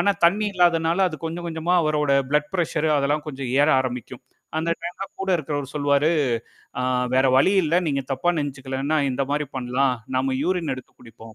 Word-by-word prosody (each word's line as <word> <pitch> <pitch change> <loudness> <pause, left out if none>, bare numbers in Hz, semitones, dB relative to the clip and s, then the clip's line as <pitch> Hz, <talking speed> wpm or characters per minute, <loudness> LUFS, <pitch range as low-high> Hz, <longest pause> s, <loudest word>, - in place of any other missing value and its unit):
ஆனா, 200 - +3
தண்ணீ 205 +5 +3
இல்லாதனால 170 0 +3
அது 155 - -7
கொஞ்சம், 170 +1 -5
கொஞ்சமா 165 +2 -1
அவரோட 150 -2 +1 0.2
ப்ளட் 150 0 +1
பிரச்சர் 160 -3 0
அதெல்லாம் 145 +2 0
கொஞ்சம் 135 -3 -5
ஏற 145 - +4
ஆரம்பிக்கும். 125 -2 -5 0.4
அந்த 165 +1 -1
டைம்லாம் 175 +3 -6
கூட 195 - -1
இருக்கிறவலு 145 -3 -4
சொல்லுவாரு, 145 +2 +2 0.7
ஆ - - -1 0.3
வேற 130 +1 +4
வழி 140 +9 +4
இல்ல. 160 +2 0
நீங்கத் 140 -1 -3
தப்பா 135 +7 +1
நினைச்சுக்கலேன்னா 140 +1 -2
இந்தமாரி 140 +3 -1
பண்ணலாம். 130 +1 +1 0.2
நாம 130 0 0
யூரின் 175 -4 0
எடுத்துக் 130 - -13
குடிப்போம் 115 -2 -14
150 Hz, 165 wpm, -23 LUFS, 135-165 Hz, 0.7 s, ஏற